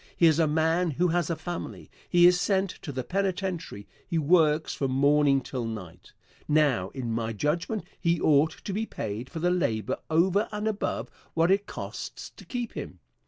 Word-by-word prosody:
Here 165 -2 +6
is 155 - 0
a 160 - +4
man 160 +3 +2
who 175 +5 +1
has 175 -1 0
a 165 - 0
family. 170 +2 -6 0.2
He 175 0 +6
is 180 +1 +5
sent 195 -2 +1
to 145 - -5
the 130 -1 -3
penitentiary. 185 - -2 0.2
He 170 - -1
works 155 0 +3
from 135 - -1
morning 140 +1 +3
till 130 -2 -4
night. 90 -6 -8 0.3
Now, 145 -11 +2
in 125 -4 -3
my 115 0 -2
judgment, 165 - -1 0.2
he 170 -2 +1
ought 155 +1 +2
to 200 - -3
be 220 +3 -2
paid 110 +4 -5
for 170 - -8
the 175 +2 +1
labor 110 - 0
over 185 +6 +2
and 210 +1 -2
above 210 -2 -2 0.2
what 165 +2 +3
it 200 +1 +2
costs - - -7
to - - -15
keep 245 -2 -4
him. - - -7
160 Hz, 185 wpm, -27 LUFS, 135-180 Hz, 0.3 s, Here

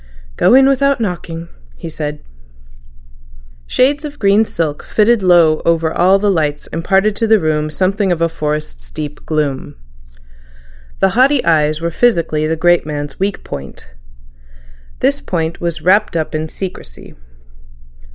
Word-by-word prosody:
"Go 245 - +4
in 270 0 +6
without 275 0 +2
knocking," 170 -5 -4 0.3
he - - -8
said. 150 -2 -6 1.4
Shades 285 +4 +1
of 295 -1 -7
green 205 +1 +3
silk 155 -7 -3
fitted 220 +1 +2
low 170 -4 +4
over 165 -1 +1
all 185 +3 +4
the 205 0 +1
lights 150 -5 -1
imparted 195 +5 +1
to 225 - 0
the 220 -1 +4
room 155 -2 -1
something 190 +4 0
of 175 - 0
a 165 - +2
forest's 150 - -5
deep 150 - -7
gloom. 150 -4 -2 1.3
The - - +4
haughty 260 +1 +2
eyes 155 -1 +2
were 170 0 -2
physically 165 -8 +1
the 160 - 0
great 175 +1 +3
man's 145 -1 -6
weak 195 +1 -2
point. 70 -2 -9 1.1
This 140 - +1
point 165 -1 -3
was 170 -2 -3
wrapped 195 +1 +2
up 160 0 -3
in 155 0 -3
secrecy. 180 - -8
170 Hz, 140 wpm, -16 LUFS, 155-205 Hz, 1.4 s, in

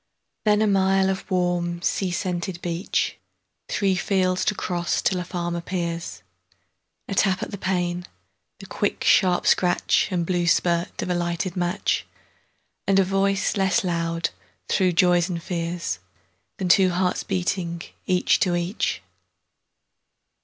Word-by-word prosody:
Then 210 0 +4
a - - +2
mile 190 -1 +3
of 190 - -5
warm 175 -1 0
sea 190 - 0
scented 175 0 -3
beach; 175 +2 -1 0.5
Three 195 -2 +1
fields 185 0 +1
to 210 - +1
cross 175 -2 -1
till 185 - +1
a - - -2
farm 175 -1 -3
appears;A 100 - -7
tap 190 -1 +2
at - - -6
the 200 - -5
pane, 180 -1 -1 0.5
the - - -11
quick - - -2
sharp 180 -3 +4
scratchAnd 180 0 +2
blue 175 -1 0
spurt 170 0 +1
of 185 - -2
a - - +3
lighted 175 +1 -2
match, 180 +2 -1 0.8
And 195 - +4
a 195 - +6
voice 195 +2 +1
less 190 -1 +2
loud, 170 -1 -1 0.4
through 185 -2 +2
joys 175 +1 +3
and 170 -2 -2
fears, 170 - -3 0.6
Than 185 - -2
the - - +9
two 190 -2 +4
hearts 180 +1 0
beating 175 -2 -2 0.2
each 180 -1 +3
to 180 -2 +2
each! 175 +5 -2
180 Hz, 140 wpm, -24 LUFS, 170-190 Hz, 0.8 s, the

